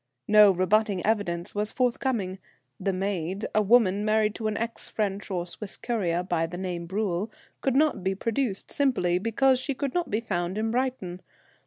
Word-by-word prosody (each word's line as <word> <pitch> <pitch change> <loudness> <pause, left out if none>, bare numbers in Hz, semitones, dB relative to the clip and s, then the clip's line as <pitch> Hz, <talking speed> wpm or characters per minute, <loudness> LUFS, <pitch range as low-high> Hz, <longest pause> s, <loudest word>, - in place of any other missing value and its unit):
No 210 -1 +8
rebutting 195 +1 +2
evidence 190 -6 0
was 210 +1 -1
forthcoming. 235 -6 -1 0.4
The 195 +1 0
maid, 190 0 -2
a 215 - +4
woman 205 -2 +4
married 215 0 +2
to 220 - -3
an 210 -1 -1
ex 230 0 -4
French 205 -2 -2
or 180 -3 -2
Swiss 195 +3 -6
courier, 180 -8 -1
by 175 -3 0
name 175 0 -4
Bruel, 195 +1 -1 0.3
could 265 -2 +1
not 295 -8 +2
be 190 +1 0
produced, 225 0 -2
simply 210 -11 +1
because 250 +5 +2
she 270 +1 -2
could 275 0 -3
not 350 -1 -1
be 210 - 0
found 185 -4 -2
in 220 +1 0
Brighton. 240 -8 -2
205 Hz, 170 wpm, -27 LUFS, 185-230 Hz, 0.4 s, No